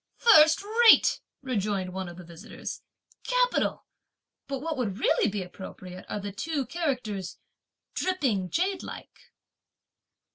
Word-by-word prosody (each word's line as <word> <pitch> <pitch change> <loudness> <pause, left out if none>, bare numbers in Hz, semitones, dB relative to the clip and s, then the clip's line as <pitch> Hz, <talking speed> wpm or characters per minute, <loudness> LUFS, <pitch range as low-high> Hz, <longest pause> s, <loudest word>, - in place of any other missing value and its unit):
'" - - -51 0.2
"First 315 +1 +6
rate!" 450 +2 +5 0.2
rejoined 200 -7 -2
one 190 -1 -4
of 175 - -11
the 180 - -9
visitors, 170 +5 -8 0.4
"capital! - - +1 0.6
but 275 - -3
what 320 +3 -3
would 220 -8 -2
really 225 -2 +2
be 200 -1 -3
appropriate 185 0 -10
are - - -3
the 200 0 -5
two 285 +6 -3
characters 250 - -3 0.6
'dripping 260 - 0
jadelike.'" 370 - -4
230 Hz, 120 wpm, -27 LUFS, -, 0.6 s, First